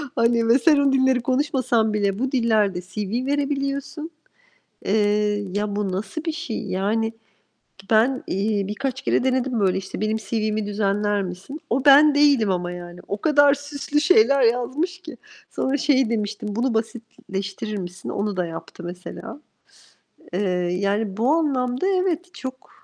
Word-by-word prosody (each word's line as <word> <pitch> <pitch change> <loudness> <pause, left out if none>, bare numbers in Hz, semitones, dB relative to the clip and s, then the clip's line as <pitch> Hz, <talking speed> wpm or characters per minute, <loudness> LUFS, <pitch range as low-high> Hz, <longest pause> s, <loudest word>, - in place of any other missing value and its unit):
Hani, 230 0 +2
ve 235 +4 +5
sen 300 +2 +4
o 280 -1 +3
dilleri 260 -1 +3
konuşmasan 255 -4 +1
bile 200 -1 0
bu 265 +1 -1
dillerde 215 -7 +1
CV 205 +6 -4
verebiliyorsun. 280 +2 -2 0.7
Eee, 210 0 +1
ya, 205 0 -2
bu 205 -2 -1
nasıl 200 - -4
bir 325 - -1
şey? 310 -8 -4
Yani, 220 +4 0 0.8
ben, 235 +4 +3
iii, 200 +1 -1
birkaç 265 +5 -3
kere - - +1
denedim, 260 -2 0
böyle, 190 -2 +2
işte, 190 +1 -6
benim 215 +1 0
CV'mi 215 0 -2
düzenler 205 0 0
misin? 185 - -7
O 260 +4 0
ben 290 +1 +7
değilim 280 -8 +4
ama 175 -1 -2
yani. 175 0 -9
O 200 - -2
kadar 290 -2 +5
süslü 285 +1 -2
şeyler 275 -4 +5
yazmış 260 +10 0
ki. - - -10 0.3
Sonra 270 +2 -1
şey 265 -5 +2
demiştim. 215 -2 -3
"Bunu 245 +2 0
basitleştirir 220 -3 -4
misin?" 180 0 -7
Onu 200 -1 -2
da 180 - 0
yaptı 165 +1 -9
mesela. 185 +9 -8 0.9
Eee, 180 - -1 0.4
yani, 200 0 -1
bu 240 +5 +2
anlamda 265 -2 0
evet, 365 -2 0
çok, 260 0 -8
230 Hz, 145 wpm, -23 LUFS, 205-275 Hz, 0.9 s, ben